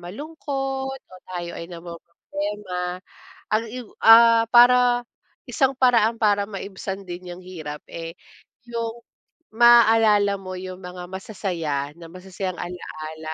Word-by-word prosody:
malungkot 270 - -5
o 185 - -18 0.2
tayo 175 -1 -4
ay 165 - -7
namomroblema 180 +2 -6 0.6
ang 220 +2 +2
i 250 +2 -7 0.2
ah, 230 0 +7
para, 245 0 +6 0.4
isang 270 -2 +1
paraan 235 -3 +3
para 205 -2 +2
maibsan 195 -1 -6
din 180 0 -8
yang 185 - -13
hirap, 155 -5 -8
eh, 165 0 -7 0.5
yung 235 0 -4 0.5
maalala 225 -4 +6
mo 185 -1 -8
yung 185 0 -8
mga 180 0 -8
masasaya 170 -8 -3
na 170 -1 -11
masasayang 185 0 -6
alaala 160 -3 -7
195 Hz, 115 wpm, -23 LUFS, 180-230 Hz, 0.6 s, ah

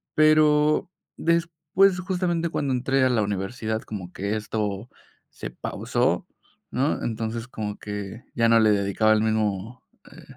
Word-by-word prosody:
pero 155 0 +4 0.3
después, 170 +3 +2
justamente, 175 -3 -1
cuando 140 -4 -1
entré 130 +1 +2
a - - +3
la 115 -3 +2
universidad, 110 +3 -3
como 95 -4 -7
que 100 +2 -2
esto 105 0 -3 0.4
se - - -8
pausó, - - -1 0.4
¿no? 135 +5 0
Entonces, 115 +1 -3
como 105 -4 -5
que 105 +2 -7
ya 115 -1 +3
no 115 0 +6
le 110 -1 +5
dedicaba 100 +2 +2
el 110 - +2
mismo, 110 +1 -1 0.3
eh, - - -14
115 Hz, 140 wpm, -25 LUFS, 105-150 Hz, 0.4 s, no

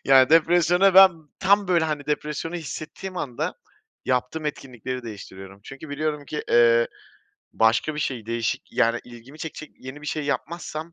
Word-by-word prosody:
Ya, 135 0 +6
depresyona 175 +3 +4
ben 190 0 +10 0.3
Tam, 200 0 +3
böyle, 170 -3 +3
hani, 150 -2 -3
depresyonu 150 +2 -3
hissettiğim 175 +3 -7
anda 130 -8 -3 0.5
yaptığım 130 +5 -1
etkinlikleri 130 -3 -5
değiştiriyorum 95 -3 -10
çünkü 140 +3 -10
biliyorum 150 0 -3
ki, 150 +2 -5
eee, 115 0 +5 0.6
başka 115 +7 +2
bir 150 - -3
şey, 120 -6 -3
değişik, 115 -1 -2
yani, 115 +1 +2
ilgimi 120 +5 -13
çekecek 155 -1 -7
yeni 130 +3 -9
bir 150 - -9
şey 155 -1 -2
yapmazsam, 160 +2 -4
150 Hz, 150 wpm, -24 LUFS, 120-160 Hz, 0.6 s, ben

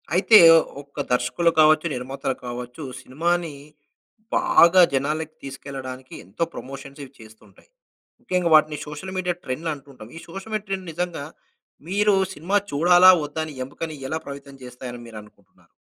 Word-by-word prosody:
అయితే 195 +4 +7 0.4
ఒక్క 140 0 -7
దర్శకులు 125 +8 +1
కావచ్చు, 155 +1 +5
నిర్మాతలు 130 +1 -4
కావచ్చు. 125 +4 -7 0.2
సినిమాని 165 +5 -1 0.8
బాగా 170 +2 +5
జనాలకి 150 +3 -2
తీసుకెళ్ళడానికి 135 -1 -8
ఎంతో 100 - -3
ప్రమోషన్స్ 135 +2 -9
ఇవి 135 - -12
చేస్తుంటాయి. 110 -2 -18 0.5
ముఖ్యంగా 180 -7 0
వాటిని 155 -1 +3
సోషల్ 150 +6 -7
మీడియా 180 -1 -1
ట్రెండ్లు 155 +6 -4
అంటూ 140 -1 -13
ఉంటాం. 115 -4 -13
ఈ - - -7
సోషల్ 195 +6 -9
మీడియా 215 -1 -3
ట్రెండ్ 190 -2 -4
నిజంగా 175 -3 -4 0.6
మీరు 205 +2 +2 0.2
సినిమా 175 +6 -3 0.2
చూడాలా 175 +5 +6 0.2
వద్దా 150 +2 -5
అని 155 - -9
ఎముకని 155 +3 -7
ఎలా 160 - -2
ప్రయత్నం 140 0 -9
చేస్తాయి 125 0 -9
అని 120 - -9
మీరు 110 -2 -10
అనుకుంటున్నారు? 105 - -23
150 Hz, 145 wpm, -23 LUFS, 130-175 Hz, 0.8 s, అయితే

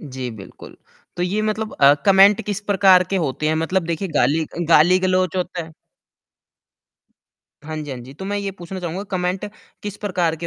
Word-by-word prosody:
जी, 130 -4 -6
बिल्कुल। 105 -4 -12 0.4
तो 175 - -2
ये 190 +4 -1
मतलब 215 0 -2
अ, 140 +1 +7
कमेंट 195 +1 +6
किस 205 -1 -3
प्रकार 190 -3 +4
के 195 - +1
होते 155 -3 -2
हैं? 155 - +1
मतलब 170 +4 0
देखिए, 170 +3 -3
गाली 150 +1 +1
अ, 155 - -12
गाली-गलौज 185 +2 +3
होता 180 -1 -3
है? 160 0 -12 1.9
हाँ 155 +1 -6
जी, 150 -2 -6
हाँ 130 - -5
जी। 125 +2 -12
तो 190 - -9
मैं 205 +1 -2
ये 200 -1 -3
पूछना 185 0 -8
चाहूँगा 175 +2 -4
कमेंट 185 0 -2 0.4
किस 205 -1 -6
प्रकार 180 -6 -1
के 170 +2 -6
180 Hz, 185 wpm, -20 LUFS, 155-195 Hz, 1.9 s, अ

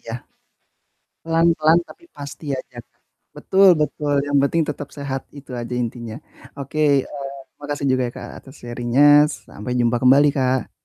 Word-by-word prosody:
Iya, 115 - -9 1.1
pelan-pelan 165 0 +3
tapi 350 -3 -16
pasti 145 +2 -9
aja 125 -1 -11
Kak. - - -43 0.4
Betul 195 0 +4
betul 150 -1 -1
yang 145 0 +2
penting 165 +4 +1
tetap 145 - -7
sehat 135 -2 -4
itu 140 -1 -12
aja 120 +1 -5
intinya. 115 -1 -6 0.4
Oke, 140 +2 -6 0.3
eee, 140 -1 -8 0.2
makasih 145 -1 -4
juga 130 0 +1
ya 120 - -9
Kak, - - -8
atas 135 +1 -15
sharing-nya. 120 +3 +1 0.4
Sampai 105 +5 -6
jumpa 120 0 +2
kembali 140 +3 +6
Kak. 130 -1 0
140 Hz, 150 wpm, -21 LUFS, 125-150 Hz, 1.1 s, kembali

